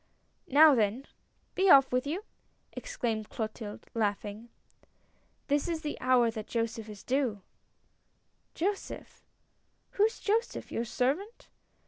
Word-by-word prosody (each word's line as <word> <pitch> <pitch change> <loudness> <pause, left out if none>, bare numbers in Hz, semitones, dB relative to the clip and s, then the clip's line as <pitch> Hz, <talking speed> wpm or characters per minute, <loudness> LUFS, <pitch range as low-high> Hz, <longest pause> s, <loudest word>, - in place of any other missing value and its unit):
"Now 300 +2 +7
then, 230 +2 +1 0.5
be 385 0 +2
off 270 -5 +7
with 255 +2 0
you!" 350 +8 -3 0.5
exclaimed 230 - -3
Clotilde, 215 -2 -6
laughing. 210 +1 -2 0.5
" - - -40
This 290 +2 +1
is 330 -2 -2
the 295 - -3
hour 250 -2 +4
that 215 -2 -7
Joseph 230 -1 -3
is 210 -2 -10
due 250 -7 -1 0.4
" - - -44
" - - -45
Joseph? 390 +4 -4 0.7
Who 405 - +2
is 445 - -2
Joseph? 445 +3 -1
Your 230 - -2
servant 285 - -2
250 Hz, 130 wpm, -30 LUFS, 220-315 Hz, 0.7 s, Now